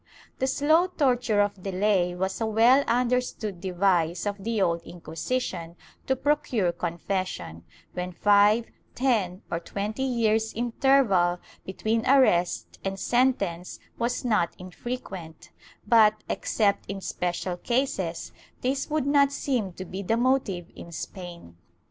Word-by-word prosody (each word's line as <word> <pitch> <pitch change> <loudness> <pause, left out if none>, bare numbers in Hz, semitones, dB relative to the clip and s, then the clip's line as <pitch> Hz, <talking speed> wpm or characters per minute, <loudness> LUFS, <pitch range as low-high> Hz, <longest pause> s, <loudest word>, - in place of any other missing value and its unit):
The 265 - +1
slow 310 +6 +3
torture 245 - +1
of 205 -2 -1
delay 185 -2 +1
was 190 +4 -2
a 225 - +1
well 235 +6 +5
understood 240 -6 0
device 180 -2 +1
of 205 -1 -3
the 225 0 -1
Old 170 -3 +1
Inquisition 170 +1 -4 0.3
to 265 - +2
procure 265 -9 +1
confession, 170 - -4 0.3
when 180 0 -4
five, 205 +4 +4 0.3
ten, 215 -8 0
or 170 - -1
twenty 205 +7 -4
years' 225 -4 +1
interval 230 -7 +3 0.3
between 220 +4 -1
arrest 180 -11 +3
and 195 0 -3
sentence 200 -9 0 0.2
was 240 +2 -1
not 210 -8 +1
infrequent,^ 185 -4 -7 0.4
but, 215 -1 +5
except 200 -4 0
in 200 0 -4
special 180 -1 -3
cases, 190 -8 -2 0.3
this 270 +3 -1
would 305 -2 0
not 280 -1 +4
seem 250 -8 -1
to 185 - -7
be 190 +2 -6
the 225 +4 0
motive 240 -9 0
in 170 - -10
Spain. 170 - -8
205 Hz, 125 wpm, -26 LUFS, 180-250 Hz, 0.4 s, well